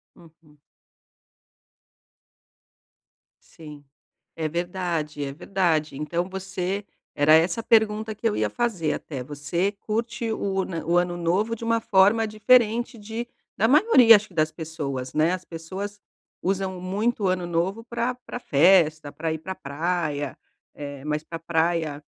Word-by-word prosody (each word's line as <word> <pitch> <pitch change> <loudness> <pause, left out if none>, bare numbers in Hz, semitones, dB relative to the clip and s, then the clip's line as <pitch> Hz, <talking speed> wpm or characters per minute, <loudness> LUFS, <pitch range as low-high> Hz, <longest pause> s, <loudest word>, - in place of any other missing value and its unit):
Uhum. 160 -2 -20 2.8
Sim, 150 -3 -13 0.5
é 160 -1 -2
verdade, 170 -3 -3
é 135 - -4
verdade. 160 -3 0
Então 170 +5 -2
você 190 +1 -3 0.3
era 145 +1 +4
essa 165 +6 +4
a - - -6
pergunta 220 -1 +2
que 225 +2 0
eu 210 - -2
ia - - 0
fazer 205 -11 -1
até, 135 -5 -5
você 150 +8 -2
curte 230 +3 -3
o 195 -3 -1
na 165 -4 -5
o 170 +2 +1
Ano 175 0 0
Novo 185 +7 0
de 230 - -8
uma 230 0 +1
forma 210 +2 +4
diferente 230 +2 +3
de 220 +3 -5 0.3
da 220 - +3
maioria, 260 - +7
acho, 210 +1 -4
que 185 - -19
das 155 -1 +1
pessoas, 145 -6 -5
né. 155 +3 +3
As 185 0 -4
pessoas 190 +6 -7 0.4
usam 190 0 -1
muito 205 +5 -1
o - - +3
Ano 180 -1 0
Novo 175 +6 -1
pra 235 +1 -2
pra 245 0 -8
festa, 155 - +4
pra 160 +2 -3
ir 160 - -3
pra 185 +4 -6
a - - -6
praia. 150 -2 -2 0.4
É, 145 -2 -7
mas 150 0 -2
pra 165 +1 -6
praia, 165 -3 -1
180 Hz, 150 wpm, -25 LUFS, 155-210 Hz, 2.8 s, maioria